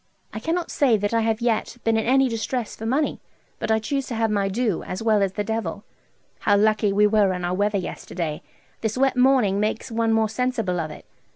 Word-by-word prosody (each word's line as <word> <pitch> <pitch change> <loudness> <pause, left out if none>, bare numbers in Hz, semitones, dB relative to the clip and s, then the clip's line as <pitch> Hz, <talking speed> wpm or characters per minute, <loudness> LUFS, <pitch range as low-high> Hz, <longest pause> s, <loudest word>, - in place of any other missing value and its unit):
I - - -4
cannot 335 +1 -2
say 255 -6 +3
that 205 +2 -2
I 230 - +3
have 225 0 0
yet 235 0 0
been 225 0 +2
in 220 0 0
any 270 +1 +4
distress 230 0 -3
for 225 - -6
money, 285 +5 0 0.4
but - - -3
I 220 - +4
chuse 270 +5 -2
to 235 - -4
have 225 -1 +1
my 200 -2 +1
due, 215 -2 0
as 185 +4 -5
well 215 -2 +3
as 195 -1 0
the 210 - -2
Devil. 205 -3 -3 0.6
How 205 -1 +3
lucky 215 0 +3
we 205 +1 +4
were 205 -2 +3
in 180 -1 -3
our 175 - -1
weather 205 +2 +1
yesterday! 170 -3 -4 0.4
This 220 +1 -2
wet 270 0 +2
morning 250 -6 +3
makes 215 +3 -2
one 225 0 +1
more 225 0 +3
sensible 220 -5 -1
of 155 -1 -3
it. - - -11
220 Hz, 220 wpm, -23 LUFS, 205-235 Hz, 0.6 s, any